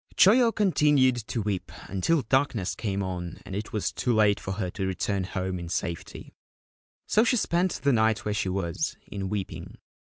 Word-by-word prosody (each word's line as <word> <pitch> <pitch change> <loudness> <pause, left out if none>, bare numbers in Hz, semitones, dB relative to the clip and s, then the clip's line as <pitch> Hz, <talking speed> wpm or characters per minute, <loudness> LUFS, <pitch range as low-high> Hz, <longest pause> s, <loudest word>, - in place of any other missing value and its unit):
Choyo 230 +4 +6
continued 150 - +3
to 115 - -2
weep 100 -3 -3 0.2
until 135 - +1
darkness 120 -6 +1
came 100 -3 -2
on 90 -2 -5
and 95 - -6
it 105 +2 -4
was 105 - -1
too 125 - -1
late 105 -2 +4
for 95 - -4
her 95 -3 -3
to 95 0 -3
return 95 0 -1
home 95 -1 -3
in 85 -1 -6
safety: 85 -1 -4 0.7
so 215 - +3
she 245 +1 +2
spent 180 -2 +1
the 140 -1 +4
night 110 -1 +2
where 105 - 0
she 100 -2 -1
was, 90 -3 -2
in 95 -1 -5
weeping. 100 -2 -5
105 Hz, 175 wpm, -27 LUFS, 95-135 Hz, 0.7 s, Choyo